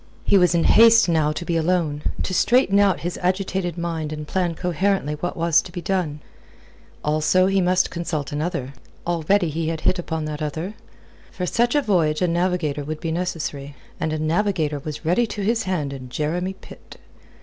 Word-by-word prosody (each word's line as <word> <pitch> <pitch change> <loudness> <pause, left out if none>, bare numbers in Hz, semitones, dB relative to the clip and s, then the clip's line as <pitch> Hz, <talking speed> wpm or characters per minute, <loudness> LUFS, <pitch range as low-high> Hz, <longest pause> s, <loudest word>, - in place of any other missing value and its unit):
He - - +3
was 180 -2 +4
in 165 - +3
haste 230 -1 +6
now 160 -3 +2
to 160 +3 -5
be 170 - -1
alone, 165 -3 0 0.2
to 185 - -3
straighten 200 0 +3
out 200 -2 +3
his 175 +1 -4
agitated 185 -1 -1
mind 165 -3 -3
and 150 -1 -6
plan 175 -2 -1
coherently 180 -2 0
what 165 +4 -4
was 165 -1 +3
to 180 - -11
be 175 - -5
done. 170 -4 -2 0.8
Also 155 +5 +3
he 195 0 +2
must 185 +1 +2
consult 160 -6 -3
another. 145 -3 -3 0.3
Already 175 +2 +1
he 160 +1 -2
had 160 -1 -3
hit 185 - +1
upon 160 -2 -3
that 155 0 -5
other. 160 +6 -3 0.6
For 180 - -4
such 240 +8 +1
a 290 - +3
voyage 170 -6 +1
a - - +3
navigator 170 -4 0
would 155 +2 -5
be 165 - -3
necessary, 160 -5 -4 0.2
and 155 - -1
a 155 - -1
navigator 155 -2 0
was 150 +3 -7
ready 205 +9 +2
to 205 -1 -5
his 230 +3 +1
hand 155 -7 -2
in 130 -2 -8
Jeremy 170 +8 -2
Pitt. 190 - -14
170 Hz, 185 wpm, -22 LUFS, 155-185 Hz, 0.8 s, haste